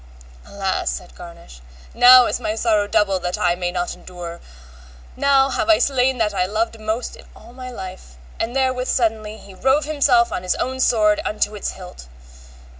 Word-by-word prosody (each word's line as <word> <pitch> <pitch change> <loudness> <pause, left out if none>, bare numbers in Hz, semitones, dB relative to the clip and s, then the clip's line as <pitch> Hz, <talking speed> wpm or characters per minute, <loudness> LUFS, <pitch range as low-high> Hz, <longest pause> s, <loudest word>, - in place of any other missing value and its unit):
Alas, 195 -2 -2
said 180 - -6
Garnish, 170 - -13 0.3
now 250 0 +8
is - - -2
my 215 - -3
sorrow 215 -3 +1
double 195 -2 +1
that 180 0 -3
I 175 -1 +2
may 175 0 -3
not 175 0 -3
endure, 175 -2 -9 0.8
now 275 0 +3
have 325 - -2
I 325 - +6
slain 265 -1 +1
that 215 -3 0
I 185 -2 0
most 225 +2 -2
loved 220 +3 -3
in - - -15
all 230 +2 -15
my 255 0 -9
life; 185 - -9 0.2
and 230 +3 -3
therewith 260 -1 0
suddenly 220 -3 -1
he 200 -2 -14
rove 265 +9 +1
himself 280 -6 +2
on - - -3
his 180 0 -1
own 260 +1 -3
sword 210 -4 +2
unto 210 0 -1
the 210 -1 -4
hilts. 180 - -12
215 Hz, 180 wpm, -20 LUFS, 185-255 Hz, 0.8 s, now